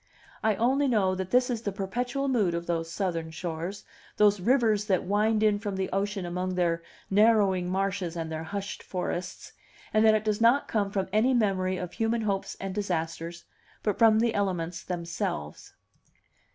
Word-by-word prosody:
I 220 -1 +2
only 265 +6 +2
know 205 -7 +2
that 185 0 -4
this 250 +2 +3
is 230 -2 -2
the 205 - -2
perpetual 245 +8 -2
mood 210 -10 +2
of 170 0 -3
those 165 -1 -2
Southern 170 -4 -2
shores, 170 +4 -5 0.3
those 205 -1 +4
rivers 220 -1 +2
that 190 -3 +1
wind 210 +3 +2
in 210 -1 +3
from 205 -2 -4
the 190 0 -2
ocean 195 -1 -1
among 180 +1 -2
their 170 -2 +1 0.3
narrowing 200 -4 +4
marshes 190 -2 -1
and 165 -1 -4
their 160 0 -4
hushed 200 +3 -5
forests, 180 -1 -5 0.4
and 215 0 +4
that 220 -1 +6
it 215 0 -1
does 215 0 0
not 240 +5 +4
come 205 -3 0
from 195 -1 -1
any 245 +5 +3
memory 190 -5 +1
of 180 -2 -5
human 225 0 0
hopes 200 -3 -2
and 195 -1 -4
disasters, 170 -3 -3 0.4
but 210 -3 -1
from 225 -2 +6
the 230 -1 +2
elements 180 -4 -1
themselves. 170 - -4
195 Hz, 175 wpm, -28 LUFS, 180-220 Hz, 0.4 s, that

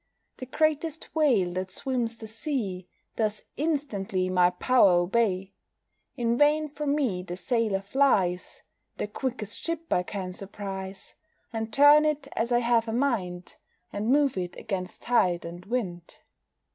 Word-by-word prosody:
The 255 - -7
greatest 310 +2 -1
whale 245 - +3
that 185 +1 -3
swims 235 +2 -2
the 225 - -8
sea 220 - -3 0.3
Does 215 -2 -1
instantly 215 - -1
my 180 -1 +5
power 195 +2 +4
obey. 190 +1 +1 0.6
In 235 -1 0
vain 300 +1 +3
from 290 0 -1
me 240 -12 0
the 180 -1 -7
sailor 220 -3 0
flies, 195 -6 +1 0.3
The - - -2
quickest 215 -1 -5
ship 330 0 -2
I 180 - +3
can 185 0 -5
surprise, 195 0 -7 0.4
And 225 0 -3
turn 290 +4 +7
it 300 -2 -1
as 235 +2 -1
I 240 0 +3
have 235 -1 +2
a 225 - -2
mind, 200 -9 -1 0.4
And 205 +2 -2
move 280 -5 +3
it 180 -1 -4
against 185 -3 -5
tide 180 -9 +2
and 175 +2 -9
wind. 185 -8 -4
225 Hz, 145 wpm, -27 LUFS, 185-270 Hz, 0.6 s, turn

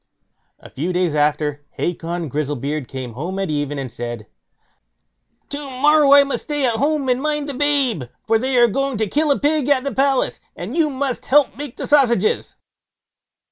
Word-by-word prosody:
A - - -15
few 160 +7 -3
days 180 -3 0
after 150 -1 0
Hacon 170 -1 -3
Grizzlebeard 145 -1 -3
came 130 -3 -7
home 170 - -5
at 195 -4 -2
even 145 -1 -2
and 135 -3 -5
said: 120 -2 -6 1.2
"To 285 - -4 0.2
morrow 295 0 +5
I 285 0 +8
must 275 - -4
stay 295 -2 0
at 235 -3 +1
home 290 +2 0
and 250 0 +1
mind 295 -1 -1
the 285 - -4
babe, 270 - +1 0.2
for 225 -1 +2
they 260 +1 0
are 240 0 +6
going 275 +2 -1
to 220 - 0
kill 300 +8 0
a 280 - +3
pig 290 -1 +1
at 270 -3 +3
the 280 -2 -3
palace, 270 +2 +1 0.2
and 195 - -6
you 320 -3 +2
must 270 -2 -3
help 290 0 +4
to - - -24
make 290 -4 -7
the - - -4
sausages." 240 -8 +2
240 Hz, 185 wpm, -20 LUFS, -, 1.2 s, I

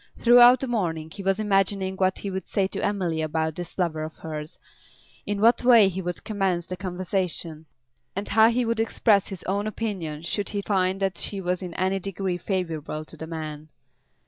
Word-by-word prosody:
Throughout 245 +1 +7
the 265 - -2
morning 165 -9 -2
he 200 - -8
was 195 +1 +1
imagining 195 -2 +1
what 190 0 +1
he 200 - -5
would 190 0 -5
say 195 - +1
to 190 - -4
Emily 180 -6 0
about 160 0 -1
this 175 +2 -7
lover 170 -4 0
of 155 +1 -6
hers, 155 -1 -7 0.7
in 205 -1 -1
what 230 +3 +4
way 235 -5 +7
he 190 0 -4
would 175 -1 -5
commence 190 -5 -1
the 185 - -5
conversation, 180 -3 -3 0.5
and 200 +2 -3
how 220 +2 +5
he 240 +1 +1
would 230 0 -1
express 220 -2 +2
his 195 -3 -7
own 200 +3 -1
opinion 185 -9 -4
should 200 +4 -2
he 205 - -2
find 190 -1 0
that 195 -1 -1
she 200 - -2
was 180 0 -1
in 180 -2 -6
any 190 +1 0
degree 190 -1 -3
favourable 160 -6 -3
to - - -10
the 160 - -7
man. 155 -2 -6
190 Hz, 195 wpm, -25 LUFS, 170-205 Hz, 0.7 s, Throughout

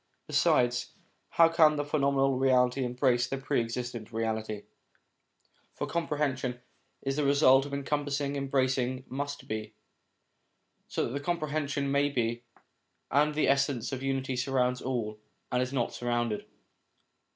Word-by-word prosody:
Besides, 120 0 +2 0.4
how 165 - +6
can 160 -2 +5
the 145 0 -2
phenomenal 140 -2 +2
reality 130 0 +3
embrace 125 -1 +1
the 135 - -3
Pre 135 -1 0
existent 120 -1 -5
Reality? 110 -2 -2 1.1
For - - -2
com 170 -1 -2
prehension 130 -4 -1 0.4
is 135 +1 -1
the 150 - +1
result 140 -1 +5
of 140 - -9
encompassing 145 0 -1
embracing 130 -2 0
must 145 +2 -5
be, 110 0 -5 1.1
so - - -1
that 140 +4 -4
comprehension 145 -4 -1
may 140 +1 +3
be 120 -3 -1 0.7
and 150 +2 +3
the 155 - +2
Essence 140 -3 +1
of 130 -1 -4
Unity 135 -1 -1
surrounds 125 0 0
all, 110 -5 -3 0.3
and 125 0 +2
is 125 0 -2
not 125 -4 -1
surrounded. 120 -3 -1
135 Hz, 130 wpm, -29 LUFS, 120-140 Hz, 1.1 s, how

